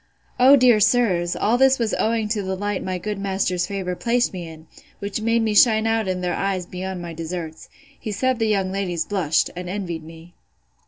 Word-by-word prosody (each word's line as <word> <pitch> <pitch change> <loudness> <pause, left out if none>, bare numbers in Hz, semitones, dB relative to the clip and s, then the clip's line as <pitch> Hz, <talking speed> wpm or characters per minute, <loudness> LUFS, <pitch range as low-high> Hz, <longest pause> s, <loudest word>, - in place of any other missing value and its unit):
O, 260 +3 +8
dear 245 -5 +5
sirs! 200 -6 +2
all 235 +4 +1
this 265 0 +5
was 230 -3 -1
owing 225 -1 0
to 210 -1 -1
the 190 -1 -3
light 205 0 -3
my 185 -1 -3
good 205 +2 -4
master's 190 -2 -1
favour 190 -2 -3
placed 240 +3 0
me 175 -2 -6
in, 160 0 -12 0.3
which 200 +2 -4
made 230 +1 +1
me 220 -1 0
shine 220 0 +5
out 225 -2 0
in 185 -1 -2
their 180 -1 -1
eyes 195 -2 -2
beyond 185 0 -6
my 170 -1 -6
deserts. 165 0 -6 0.3
He 215 - -5
said 255 +4 0
the 225 - +1
young 195 -3 0
ladies 180 -4 -2
blushed, 175 -6 0
and 180 0 -6
envied 180 -4 -4
me. 165 +2 -13
195 Hz, 205 wpm, -22 LUFS, 180-220 Hz, 0.3 s, O